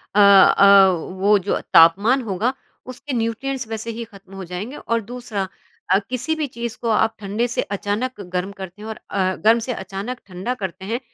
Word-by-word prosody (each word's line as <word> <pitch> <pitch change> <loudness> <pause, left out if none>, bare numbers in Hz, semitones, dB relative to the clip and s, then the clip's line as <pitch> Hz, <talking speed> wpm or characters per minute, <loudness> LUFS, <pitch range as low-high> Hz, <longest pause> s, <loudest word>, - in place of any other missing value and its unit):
अ - - +4
अ, 200 0 +7
वो 190 +4 +1
जो 195 +2 -1
तापमान 200 +11 +6
होगा 225 +2 -1 0.3
उसके 260 +3 -7
न्यूट्रिएंट्स 245 +2 -2
वैसे 225 +1 -5
ही 235 - -4
खत्म 195 -3 -16
हो 195 - -6
जाएँगे 185 +10 -6
और 230 0 -1
दूसरा 225 -4 -5 0.4
अ, 190 +2 +4
किसी 255 +6 -2
भी 305 -2 -2
चीज़ 235 -2 -6
को 235 - -1
आप 220 0 +2
ठंडे 210 +4 -1
से 240 - -1
अचानक 205 +4 -3
गर्म 180 +1 -4
करते 190 0 -10
हैं 215 - -8
और 220 - -7
अ, 185 -1 0
गर्म 225 +3 +3
से 245 +2 -3
अचानक 195 +6 -6
ठंडा 190 +6 -4
करते 190 +1 -5
हैं, 230 +4 -2
210 Hz, 190 wpm, -21 LUFS, 195-235 Hz, 0.4 s, अ